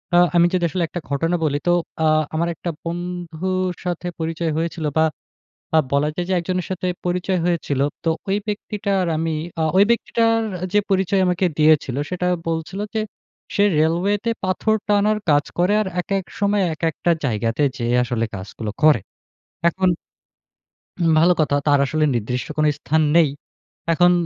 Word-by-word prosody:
আ - - +6 0.2
আমি 170 0 +6
যদি 180 -1 +1
আসলে 180 +1 -1
একটা 175 - -5
ঘটনা 165 +5 0
বলি 145 -2 +1
তো - - +5 0.3
আ - - +4 0.3
আমার 170 +2 +1
একটা 170 - -5
বন্ধুর 175 +1 -3
সাথে 175 0 -3
পরিচয় 165 0 -2
হয়েছিল 165 -1 -2
বা 160 - +5 0.7
আ - - +6
বলা 140 +1 +2
যায় 175 - -2
যে - - +2
একজনের 180 +1 -2
সাথে 185 0 -2 0.2
পরিচয় 180 +1 0
হয়েছিল। 170 -6 0 0.2
তো 165 - +1 0.2
ঐ - - -4 0.2
ব্যক্তিটা 205 -1 -3
আর 180 - 0
আমি 165 +1 -1 0.3
আ - - +2
ঐ - - +7
ব্যক্তিটার 230 -1 +2 0.3
যে 210 - +5
পরিচয় 195 0 +2
আমাকে 180 +1 +1
দিয়েছিল 150 -4 +3
সেটা 180 0 -1 0.2
বলছিল 165 +4 -3
যে 220 - +1 0.5
সে 205 - +4 0.2
রেলওয়েতে 190 +8 +1
পাথর 190 +4 +1
টানার 210 +1 +3
কাজ 145 -1 +4
করে 180 +4 +3
আর 210 - -2
একেক 195 +1 -2 0.2
সময় 205 0 +2
একেকটা 165 +2 0
জায়গাতে 115 +3 0
যেয়ে 120 0 0
আসলে 120 -2 -1
কাজগুলো 100 +3 -6
করে। 155 -5 +6 0.7
এখন 185 +2 +1 1.1
হুম 170 -2 +2
ভালো 175 +2 +5
কথা 145 -2 +2
তার 145 -1 +5
আসলে 155 +2 0
নির্দিষ্ট 120 +2 -2
কোন 155 0 +2
স্থান 155 +3 +1
নেই। 165 -3 +6 0.6
এখন 175 +2 +5
170 Hz, 160 wpm, -21 LUFS, 155-185 Hz, 1.1 s, ঐ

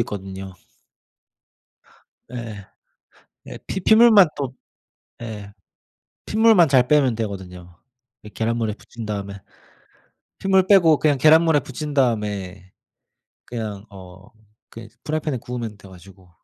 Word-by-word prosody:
있거든요. 95 -3 -6 1.8
예. 110 -5 -7 0.8
예. - - -9
피 190 - -4
핏물만 220 -2 +6
또 135 -3 -4 0.7
예. 105 -3 -8 0.7
핏물만 220 -5 +4
잘 130 -2 +4
빼면 135 -5 +3
되거든요. 90 -5 -7 0.5
이 105 - -11
계란물에 115 +1 -2
부친 115 +1 -11
다음에 100 -2 -5 1.0
핏물 190 -1 +2
빼고 170 -6 +5
그냥 145 -3 +1
계란물에 160 +1 +5
부친 145 +3 -7
다음에 100 -7 -2 0.7
그냥 110 -4 -6
어 95 -1 -14 0.4
그냥 115 -1 -11 0.2
프라이팬에 155 -3 -2
구우면 115 -3 -7
돼 100 - -15
가지고. 95 0 -17
115 Hz, 235 characters per minute, -21 LUFS, 100-150 Hz, 1.8 s, 핏물만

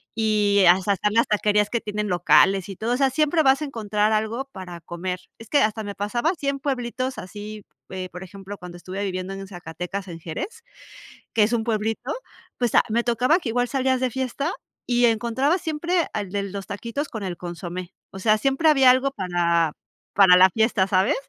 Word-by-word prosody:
y 210 -3 +3
hasta 190 +3 +4
están 210 +2 -1
las 230 +1 +4
taquerías 210 0 +2
que 235 - 0
tienen 210 0 -3
locales 190 +1 +4
y 195 - -6
todo, 225 +5 -1
o - - +1
sea, 270 0 +3
siempre 305 +4 +2
vas 270 +1 +4
a - - -1
encontrar 215 -5 0
algo 220 +5 -1
para 180 -5 -8
comer. 180 +2 -4 0.2
Es 225 - -12
que 290 - +4
hasta 215 +1 0
me 200 -1 -6
pasaba 235 +9 -1
así 315 -6 -6
en 275 0 -2
pueblitos 255 -1 -3
así, 210 +2 -8 0.2
eh, 185 -1 -5
por 180 - -8
ejemplo, 195 +2 -9
cuando 175 -1 -9
estuve 185 +3 -5
viviendo 185 -1 -3
en 195 0 -7
Zacatecas, 180 +1 -6
en 165 -1 -8
Jerez, 405 - -6 0.7
que 225 - +3
es 220 +3 +1
un 230 -2 +1
pueblito, 225 +3 -2 0.5
pues, 240 -3 0
a - - +6
me 235 +2 +1
tocaba 250 +8 +2
que 275 - -4
igual 245 +2 +1
salías 260 -1 +1
de 255 -1 0
fiesta 265 +6 -2 0.3
y 245 0 +3
encontrabas 240 - +1
siempre 335 +1 0
al 205 -3 -3
de 200 0 -1
los 200 0 -6
taquitos 235 +8 -4
con 220 -4 -6
el 180 -3 -4
consomé, 175 +1 -6 0.2
o - - -9
sea, 215 +2 +3
siempre 275 +7 +2
había 270 -4 +6
algo 260 +2 +2
para 175 - +1 0.4
para 190 -2 +7
la 185 +1 +7
fiesta, 220 -3 +2
¿sabes? 190 0 +2
215 Hz, 200 wpm, -23 LUFS, 190-255 Hz, 0.7 s, para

